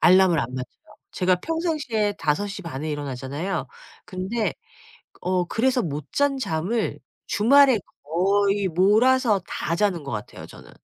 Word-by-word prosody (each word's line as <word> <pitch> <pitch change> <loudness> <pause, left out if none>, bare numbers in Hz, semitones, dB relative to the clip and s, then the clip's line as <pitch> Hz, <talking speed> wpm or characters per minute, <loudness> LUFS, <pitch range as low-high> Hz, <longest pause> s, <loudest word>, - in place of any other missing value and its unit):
알람을 185 -2 +5
안 - - -1
맞춰요. 130 -1 -9 0.2
제가 185 0 +2
평상시에 300 - -1
5:30 170 -2 -2
에 155 - -2
일어나잖아요. 145 +5 -4 0.4
근데 200 +4 -2 0.7
어 180 0 0
그래서 250 +7 +1
못 150 -4 -5
잔 285 -1 +1
잠을 185 - -1 0.3
주말에 265 +3 +5 0.2
거의 195 +5 +1
몰아서 215 +5 +3
다 165 - -2
자는 190 -4 +1
것 140 - -6
같아요 105 -1 -6
저는. - - -14
195 Hz, 260 characters per minute, -24 LUFS, 160-225 Hz, 0.7 s, 알람을